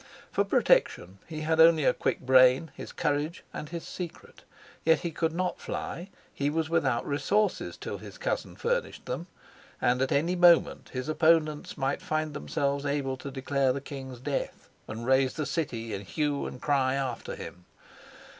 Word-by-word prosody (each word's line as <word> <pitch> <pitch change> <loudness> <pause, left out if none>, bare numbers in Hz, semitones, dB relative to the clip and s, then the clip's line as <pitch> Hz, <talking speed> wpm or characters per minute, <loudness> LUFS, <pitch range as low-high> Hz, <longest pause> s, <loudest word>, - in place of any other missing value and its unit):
For - - +2
protection 95 +2 +2
he 155 -2 -6
had 160 +1 0
only 165 -2 +7
a - - +4
quick - - -1
brain, 130 +4 +5
his - - -8
courage, 145 +3 -1
and 150 - -6
his 170 -1 -6
secret. 175 -3 -8 0.4
Yet 160 -1 +4
he 170 - -3
could 165 +1 0
not 180 +2 -2
fly 175 +4 -5 0.2
he 140 +1 0
was 160 +1 -1
without 135 -8 +1
resources 195 +9 0
till - - -6
his - - -10
cousin - - -2
furnished - - -2
them 170 - -4 0.5
and 125 +1 +2
at 135 - +1
any 165 +6 +2
moment 175 -1 +4
his 130 0 -4
opponents 155 -1 +2
might 135 -1 -1
find 155 -1 -2
themselves 140 -1 -1
able 140 -2 -1
to 140 - -7
declare 135 0 +1
the 140 - -3
king's 135 -3 -8
death 140 +2 -4 0.2
and 110 +2 -6
raise 130 0 +3
the 155 - -2
city 115 -10 -3
in 100 - -3
hue 140 - -1
and 125 - -9
cry 135 -3 +2
after 130 -3 -3
him. 90 0 -9
145 Hz, 170 wpm, -28 LUFS, 130-160 Hz, 0.5 s, only